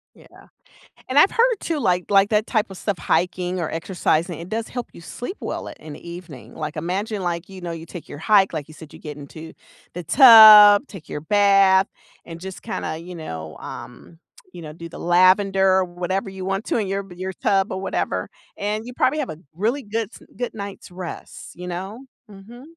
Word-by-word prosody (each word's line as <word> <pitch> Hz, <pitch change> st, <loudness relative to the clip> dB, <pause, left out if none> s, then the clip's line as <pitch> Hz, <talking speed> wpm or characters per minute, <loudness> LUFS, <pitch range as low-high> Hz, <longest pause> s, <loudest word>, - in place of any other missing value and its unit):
Yeah. -, -, -19 dB, 0.8 s
And 260 Hz, -, -2 dB
I've 300 Hz, -, +6 dB
heard 475 Hz, 0 st, +3 dB
too 325 Hz, -3 st, -2 dB
like, 180 Hz, -8 st, +1 dB
like 195 Hz, 0 st, +5 dB
that 215 Hz, 0 st, +2 dB
type 215 Hz, -4 st, 0 dB
of 190 Hz, -, -10 dB
stuff, 205 Hz, -1 st, -2 dB
hiking 180 Hz, +2 st, -1 dB
or 160 Hz, -, -2 dB
exercising, 170 Hz, 0 st, -1 dB
it 170 Hz, -, -9 dB
does 225 Hz, +1 st, -3 dB
help 245 Hz, -1 st, -6 dB
you -, -, -14 dB
sleep 245 Hz, -, -7 dB
well -, -, -5 dB
at -, -, -12 dB
in 155 Hz, -1 st, -10 dB
the 170 Hz, -, -11 dB
evening. 150 Hz, -10 st, -11 dB
Like, 155 Hz, -1 st, -5 dB
imagine 200 Hz, +4 st, -3 dB
like, 170 Hz, 0 st, -3 dB
you 190 Hz, -1 st, -11 dB
know, 175 Hz, -1 st, -5 dB
you 165 Hz, 0 st, -7 dB
take 175 Hz, -1 st, -10 dB
your -, -, -8 dB
hike, 195 Hz, +4 st, +3 dB
like 150 Hz, -2 st, -4 dB
you 155 Hz, -, -14 dB
said, 155 Hz, -1 st, -13 dB
you -, -, -12 dB
get 150 Hz, -2 st, -8 dB
into 155 Hz, +3 st, -11 dB, 0.4 s
the 175 Hz, 0 st, -6 dB
tub, 215 Hz, -, +9 dB
take 190 Hz, -6 st, -12 dB
your 150 Hz, -, -6 dB
bath, 195 Hz, +1 st, +4 dB, 0.4 s
and 165 Hz, -1 st, -9 dB
just 190 Hz, +1 st, -8 dB
kinda, 160 Hz, -, -4 dB
you 175 Hz, +2 st, -9 dB
know, 80 Hz, -, -7 dB
um, 165 Hz, -, -10 dB, 0.3 s
you 175 Hz, -, -10 dB
know, 150 Hz, -1 st, -9 dB
do 170 Hz, +1 st, -10 dB
the -, -, -11 dB
lavender 190 Hz, +2 st, +3 dB
or 185 Hz, -, +1 dB
whatever 180 Hz, +2 st, -3 dB
you 190 Hz, -1 st, -8 dB
want 195 Hz, +3 st, -2 dB
to -, -, -1 dB
in 210 Hz, -4 st, -1 dB
your 195 Hz, +1 st, -3 dB
your 185 Hz, +2 st, -5 dB
tub 195 Hz, 0 st, 0 dB
or 190 Hz, -, -4 dB
whatever, 195 Hz, -, -2 dB, 0.3 s
and 210 Hz, +2 st, -3 dB
you 245 Hz, -, -8 dB
probably 270 Hz, +4 st, +1 dB
have 185 Hz, -, -3 dB
a 155 Hz, -, -7 dB, 0.2 s
really 230 Hz, -, -1 dB
good, 220 Hz, -2 st, -3 dB
s -, -, -14 dB
good 245 Hz, -1 st, -4 dB
night's 200 Hz, -3 st, -8 dB
rest, 180 Hz, -1 st, -9 dB
you 180 Hz, +1 st, -8 dB
know. 190 Hz, +8 st, -6 dB, 0.2 s
Mhm. 210 Hz, +5 st, -13 dB
190 Hz, 210 wpm, -22 LUFS, 170-210 Hz, 0.8 s, tub